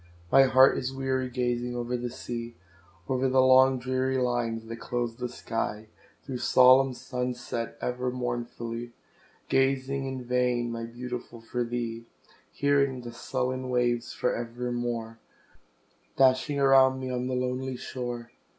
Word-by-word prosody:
My 135 - +7
heart 130 0 +6
is 130 0 -3
weary 130 -1 -1
gazing 120 -1 -1
o'er 120 0 -2
the 120 0 -3
sea; 120 -1 -6 0.5
O'er 130 0 +1
the 130 +1 +3
long 130 0 +6
dreary 130 +1 -1
lines 120 -3 -1
that 115 +1 -7
close 120 -2 -2
the 125 +1 -4
sky; 110 -3 -4 0.3
Through 130 -3 -5
solemn 130 +1 +6
sun 125 0 -3
sets 115 -1 -5
ever 125 +1 -1
mournfully, 120 -1 -4 0.5
Gazing 135 0 +1
in 130 -1 -5
vain, 125 -1 +1
my 115 0 -4
Beautiful, 120 0 -7
for 120 +2 -3
thee; 115 -1 -4 0.4
Hearing 140 -2 +1
the 120 -1 -8
sullen 130 +1 -3
waves 120 -1 0
for - - -1
evermore 120 -1 -4 1.0
Dashing 135 +2 +3
around 135 -1 +5
me 130 -1 -4
on 125 0 -2
the 130 - -1
lonely 125 +1 -2
shore. 120 -2 -5
125 Hz, 140 wpm, -28 LUFS, 120-130 Hz, 1.0 s, My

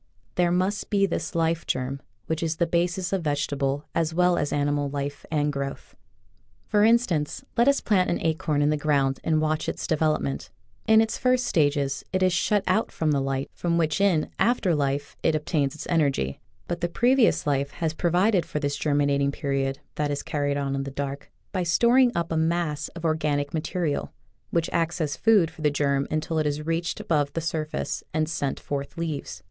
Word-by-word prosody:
There 175 -1 +2
must 185 +4 0
be 200 -1 +3
this 180 - -3
life 165 0 0
germ, 130 +2 -2 0.2
which 160 0 -2
is 165 -1 -1
the 170 - +1
basis 175 +2 0
of 190 - +1
vegetable 145 -1 -1
as 160 -1 0
well 180 0 +4
as 145 -3 -1
animal 145 0 0
life 140 0 -5
and 150 -1 0
growth. 140 0 -5 0.7
For 210 -1 +2
instance, 225 - +2
let 240 +1 +3
us 280 0 +4
plant 190 -4 +2
an 175 - 0
acorn 155 -2 +1
in 145 - +3
the 150 - +1
ground 140 -3 +1
and 160 -1 +2
watch 155 0 0
its - - -4
development. 155 -3 0 0.4
In 220 0 +7
its 225 -1 -1
first 255 -1 +2
stages 145 - +1
it 185 0 +1
is 185 -1 +3
shut 205 +3 +2
out 185 +5 +1
from 155 -2 0
the 140 - +2
light 135 0 -2
from 170 -1 -1
which 160 +2 +1
in 180 -6 +2
after 210 -4 +2
life 140 -1 -1
it 160 - +2
obtains 150 -2 0
its - - -7
energy, 140 - 0 0.3
but 175 0 -3
the 175 - 0
previous 245 +6 +3
life 140 -1 +1
has 160 -1 -2
provided 180 +4 +2
for 150 - -4
this 145 -1 -1
germinating 140 -2 +1
period 135 -2 -1 0.2
that 150 -1 0
is 145 -1 -2
carried 145 -1 -1
on 140 -1 -1
in 135 - -1
the 135 - -4
dark 140 +1 -5 0.2
by 185 - -1
storing 235 +9 +4
up 170 0 -1
a - - 0
mass 160 -2 0
of 170 0 -6
organic 150 -3 0
material, 160 -1 -2 0.4
which 165 -1 0
acts 170 +1 0
as 150 -3 -1
food 205 -8 +4
for 160 -1 -13
the 150 - +3
germ 140 -1 0
until 155 +1 -1
it 155 - +1
has 150 +1 -2
reached 165 +1 -1
above 145 -3 0
the - - -1
surface 160 -1 -3
and 155 0 +1
sent 145 -4 -2
forth 140 +1 -5
leaves. 160 -4 -4
155 Hz, 195 wpm, -25 LUFS, 145-175 Hz, 0.7 s, In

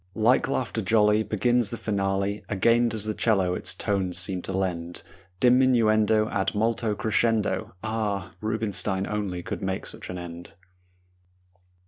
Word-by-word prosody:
Like 115 +4 +3
laughter 125 -4 -2
jolly 105 +1 +3
Begins 110 +2 +1
the 115 - -5
finale; 100 -1 -1
Again 115 +4 +3
does 110 -2 -2
the 110 - -1
'cello 95 -5 +1
its - - 0
tones 95 -3 -1
seem 90 +1 0
to - - -6
lend 90 -3 -3 0.4
Diminuendo 110 -4 +4
ad 95 0 -1
molto 110 0 0
crescendo. 110 -3 0
Ah! 110 -3 -2
Rubinstein 105 -3 -1
only 100 -4 -3
could - - -5
make 95 0 -3
such - - -9
an 90 - -5
end! 85 0 -9
105 Hz, 135 wpm, -26 LUFS, 95-110 Hz, 0.4 s, Diminuendo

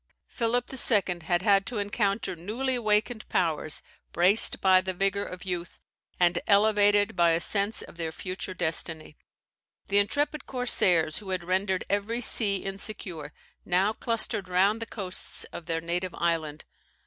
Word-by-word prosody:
Philip 240 +1 -1
II. 205 -8 +3
had 175 +1 0
had, 200 -2 +4
to 245 - -4
encounter 205 -1 -1
newly 225 +10 -2
awakened 220 -1 0
powers, 155 -3 0 0.3
braced 185 +5 +4
by 185 -1 +5
the 185 0 -4
vigour 195 +2 0
of 180 -1 -9
youth, 175 -2 -5 0.4
and 175 -1 +2
elevated 205 0 +3
by 170 -2 +3
a 165 - +1
sense 200 +4 0
of - - -14
their 165 -2 -3
future 185 +2 -6
destiny. 160 -2 -1 0.7
The 200 +1 +4
intrepid 290 +7 -1
corsairs, 180 - +2
who 205 -2 -11
had 185 -2 -2
rendered 185 +1 -1
every 205 +4 -1
sea 210 -3 +4
insecure, 195 -6 -5 0.3
now 190 +4 +1
clustered 220 -5 -1
round 195 +5 +2
the 230 - -4
coasts 190 -4 -2
of 170 - -9
their 165 -1 -1
native 175 +2 -3
island. 160 -3 -2
195 Hz, 150 wpm, -27 LUFS, 175-210 Hz, 0.7 s, by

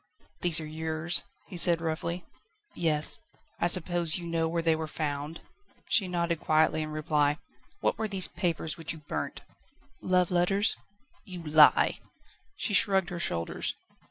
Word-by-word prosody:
"These 170 -2 +4
are 155 - -6
yours?" 160 +2 -1 0.2
he 190 - -9
said 170 -1 +5
roughly. 170 +2 -3 0.5
"Yes." 155 -3 +1 0.4
"I 170 - +2
suppose 175 -1 +3
you 175 - -7
know 165 -1 0
where 165 0 -1
they 165 -1 +3
were 160 0 -4
found?" 150 +1 -4 0.5
She 200 -6 +3
nodded 170 -2 -1
quietly 155 0 +2
in 155 - -4
reply. 150 -1 +1 0.4
"What - - 0
were 220 - -1
these 195 -3 +1
papers 170 -3 -2
which 165 - -3
you 160 - -11
burnt?" - - -4 0.6
"Love 180 -1 +2
letters." 195 +4 +3 0.5
"You 180 -3 -8
lie!" 150 -1 +5 0.6
She 210 - -2
shrugged 195 -3 +3
her 175 - -4
shoulders. 85 - -2
165 Hz, 150 wpm, -29 LUFS, 155-175 Hz, 0.6 s, said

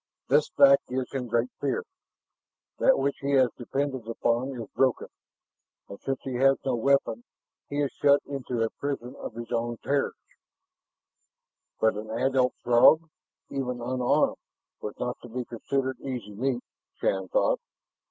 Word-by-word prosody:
"This - - +4
fact 275 0 +7
gives 130 0 -3
him 130 -2 -3
great 120 +2 0
fear. 135 -3 -1 1.0
That - - +5
which 140 +1 0
he 140 +1 0
has 130 -3 +5
depended 130 -1 -3
upon 120 +3 -1
is 115 - -6
broken. 130 -3 +1 0.8
And 100 - -9
since 135 -1 -2
he 130 -2 -3
has 135 +1 +5
no 130 - +1
weapon, 140 - +2 0.5
he 145 +1 -1
is 140 - -1
shut 140 0 +6
into 125 -4 -2
a 115 - -1
prison 135 -3 -4
of - - -7
his 120 -1 -7
own 120 0 -1
terrors." 140 0 0 1.6
But 110 - +4
an 110 +1 -6
adult 130 +2 +1
Throg, 155 +7 +5 0.4
even 125 -3 -2
unarmed, 125 +1 +1 0.4
was 105 - -6
not 125 0 -3
to 120 - -11
be 125 +2 -4
considered 130 +2 -2
easy 125 -7 -5
meat, 125 +3 -1 0.3
Shann - - -1
thought. - - +2
130 Hz, 150 wpm, -27 LUFS, 120-140 Hz, 1.6 s, fact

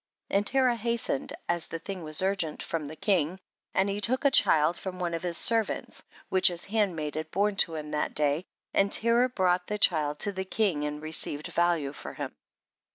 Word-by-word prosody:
33. - - +2
And 205 +1 -1
Terah 260 -3 +3
hastened, 235 - -1
(as 175 -1 +2
the 165 - -5
thing 190 +2 -7
was 155 +2 +3
urgent 185 -5 -2
from 160 -3 -4
the 155 - -9
king), 180 -1 -1 0.4
and 190 +1 +2
he 200 +1 -3
took 255 +6 -1
a 280 - +5
child 160 - +4
from 185 0 -7
one 175 -2 -3
of 165 - -3
his 175 -2 0
ser 230 -1 +7
vants, - - -6 0.3
which 185 0 +3
his 175 -1 -2
handmaid 185 -8 -2
had 155 +1 -5
born 205 +4 0
to 165 -4 +3
him 150 -1 -7
that 150 - -2
day, 150 +2 +1 0.3
and 200 0 +2
Terah 235 +2 +3
brougiit 180 -5 0
the 210 - -3
child 150 -7 +2
to 205 - +4
the 190 -1 -4
king 190 -7 -1
and 150 +1 -5
received 155 -1 -1
value 170 -5 0
for - - -9
him. - - -6
180 Hz, 210 wpm, -27 LUFS, 155-205 Hz, 0.4 s, ser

